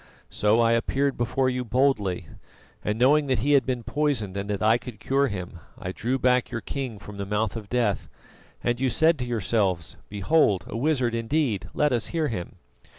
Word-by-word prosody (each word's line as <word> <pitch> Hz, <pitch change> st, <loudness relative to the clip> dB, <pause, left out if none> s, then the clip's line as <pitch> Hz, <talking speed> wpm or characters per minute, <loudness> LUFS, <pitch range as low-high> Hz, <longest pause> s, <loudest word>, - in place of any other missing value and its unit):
So 105 Hz, +2 st, +2 dB
I 115 Hz, 0 st, +4 dB
appeared 135 Hz, +4 st, +1 dB
before 120 Hz, +3 st, 0 dB
you 125 Hz, 0 st, -1 dB
boldly, 115 Hz, -7 st, +1 dB, 0.6 s
and 105 Hz, +1 st, -1 dB
knowing 145 Hz, +5 st, +4 dB
that 130 Hz, -2 st, +2 dB
he 145 Hz, -, +3 dB
had 140 Hz, -2 st, +4 dB
been 125 Hz, -2 st, -1 dB
poisoned 130 Hz, -9 st, -1 dB
and 100 Hz, +1 st, -4 dB
that 100 Hz, 0 st, -2 dB
I 110 Hz, +2 st, +4 dB
could 120 Hz, -5 st, -10 dB
cure 140 Hz, +3 st, +1 dB
him, 90 Hz, -5 st, -6 dB, 0.2 s
I 90 Hz, -, -5 dB
drew 120 Hz, +7 st, -1 dB
back 125 Hz, -1 st, +2 dB
your 120 Hz, -, -3 dB
king 130 Hz, -3 st, -5 dB
from 105 Hz, 0 st, -10 dB
the 100 Hz, -, -3 dB
mouth 105 Hz, +1 st, -1 dB
of 110 Hz, -3 st, -7 dB
death, 115 Hz, -5 st, 0 dB, 0.5 s
and 120 Hz, +1 st, 0 dB
you 135 Hz, -, +2 dB
said 160 Hz, +5 st, +3 dB
to 125 Hz, -, -2 dB
yourselves: 105 Hz, -7 st, -1 dB
'Behold 105 Hz, -, +2 dB
a 120 Hz, -, -6 dB
wizard 130 Hz, -2 st, +1 dB
indeed! 115 Hz, -1 st, -1 dB
Let 150 Hz, -1 st, +2 dB
us 115 Hz, -2 st, 0 dB
hear 160 Hz, -3 st, -1 dB
him. 110 Hz, -7 st, -5 dB
120 Hz, 195 wpm, -25 LUFS, 105-135 Hz, 0.6 s, I